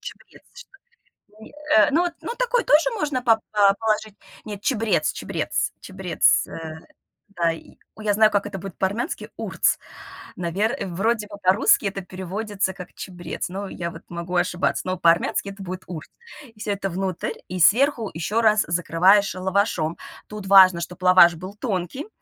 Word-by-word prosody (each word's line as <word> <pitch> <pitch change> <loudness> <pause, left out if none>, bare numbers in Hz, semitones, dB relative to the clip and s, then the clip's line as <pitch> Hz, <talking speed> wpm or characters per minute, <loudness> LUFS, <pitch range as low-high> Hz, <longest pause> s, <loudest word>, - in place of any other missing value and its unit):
чабрец - - -12
что 485 - -13 0.7
ли, - - -13 0.3
э, 210 - +6
ну, 320 - +3
вот, 345 -1 -2
ну, - - -4
такой - - +1
тоже 310 +11 +4
можно 290 -5 -1
поп 225 -2 +4
па 200 -2 +4
положить. 215 -1 -1 0.3
Нет, 205 -2 -7
чабрец 210 - +1
чабрец - - -2
чабрец, - - +1
э, 160 -1 -8 0.6
да, 170 -2 +1
и 165 - -11 0.2
ой, 215 - -11
я 205 - +2
знаю, 215 +1 +5
как 205 0 0
это 195 -2 -6
будет 195 -1 -9
по-армянски- 205 - -3
урц. - - 0 0.6
Навер 195 +8 -1
вроде 210 +5 -1
бы 205 -1 -10
по-русски 190 +3 +4
это 195 0 -3
переводится 190 +2 -4
как 180 -1 -11
чабрец, 175 -2 -6
но 195 +2 -5
я 170 -1 -5
вот - - -11
могу 170 +1 -5
ошибаться, 175 0 0
но 185 - -1
по-армянски 170 +3 +2
это 195 0 -9
будет 185 0 -6
урц. 160 -4 -8 0.5
И 215 - -21
всё 210 - -3
это 195 0 -3
внутрь 185 0 -3
и 185 0 -5
сверху 235 - +3
еще 200 +8 -1
раз 215 -2 +4
закрываешь 180 +4 +3
лавашом. 185 -3 0 0.3
Тут 210 -2 -8
важно, 185 -3 +7
чтобы 180 +1 -7
лаваш 180 -2 +7
был 185 +4 -9
тонкий, 210 - -4
195 Hz, 165 wpm, -23 LUFS, 180-215 Hz, 0.7 s, важно